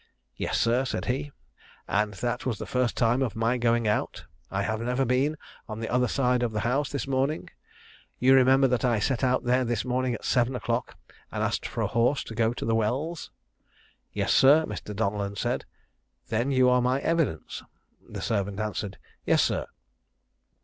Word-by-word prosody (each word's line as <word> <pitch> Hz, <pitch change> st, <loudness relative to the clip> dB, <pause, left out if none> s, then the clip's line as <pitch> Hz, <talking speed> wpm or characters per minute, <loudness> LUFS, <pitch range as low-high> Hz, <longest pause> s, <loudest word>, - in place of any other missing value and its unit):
"Yes, -, -, -1 dB
sir," 120 Hz, +3 st, +2 dB
said 130 Hz, -, -3 dB
he. 140 Hz, +3 st, -2 dB, 0.6 s
"And 105 Hz, 0 st, 0 dB
that 120 Hz, +3 st, -2 dB
was 120 Hz, -5 st, -2 dB
the -, -, -6 dB
first 125 Hz, -2 st, 0 dB
time 120 Hz, +2 st, +2 dB
of 125 Hz, -5 st, -1 dB
my 115 Hz, +3 st, +1 dB
going 115 Hz, -1 st, +2 dB
out; 105 Hz, -, -1 dB, 0.2 s
I -, -, -1 dB
have 110 Hz, +1 st, -2 dB
never 125 Hz, +3 st, 0 dB
been 135 Hz, +5 st, +1 dB, 0.3 s
on 110 Hz, 0 st, -5 dB
the 115 Hz, -, -4 dB
other 125 Hz, 0 st, +2 dB
side 125 Hz, 0 st, +1 dB
of 120 Hz, -2 st, 0 dB
the 105 Hz, -, -1 dB
house 135 Hz, +4 st, 0 dB
this 140 Hz, -, -3 dB
morning: 135 Hz, +3 st, -1 dB, 0.7 s
you 130 Hz, +2 st, +5 dB
remember 135 Hz, +1 st, +5 dB
that 125 Hz, -1 st, 0 dB
I 120 Hz, -3 st, +2 dB
set 120 Hz, +5 st, 0 dB
out 130 Hz, 0 st, +2 dB
there 125 Hz, +1 st, +2 dB
this 120 Hz, -2 st, -1 dB
morning 125 Hz, -1 st, 0 dB
at -, -, -9 dB
seven 125 Hz, 0 st, +2 dB
o'clock, 120 Hz, 0 st, -2 dB, 0.3 s
and -, -, -2 dB
asked -, -, -1 dB
for -, -, -4 dB
a -, -, +2 dB
horse 120 Hz, +4 st, +1 dB
to -, -, -9 dB
go 115 Hz, 0 st, +1 dB
to 120 Hz, -, -5 dB
the 115 Hz, -, +1 dB
wells?" 130 Hz, +10 st, -1 dB, 0.8 s
"Yes, -, -, 0 dB
sir." 150 Hz, +4 st, +6 dB
Mr. 105 Hz, 0 st, -6 dB
Donellan 100 Hz, -1 st, -1 dB
said, -, -, -2 dB, 0.6 s
"then 120 Hz, +4 st, 0 dB
you 130 Hz, -2 st, +4 dB
are 125 Hz, 0 st, +4 dB
my 125 Hz, +2 st, +1 dB
evidence." 165 Hz, -, -1 dB, 0.5 s
The -, -, -6 dB
servant 100 Hz, -2 st, -1 dB
answered, 105 Hz, -2 st, -3 dB, 0.3 s
"Yes, -, -, +3 dB
sir." -, -, -1 dB
125 Hz, 185 wpm, -27 LUFS, 115-130 Hz, 0.8 s, sir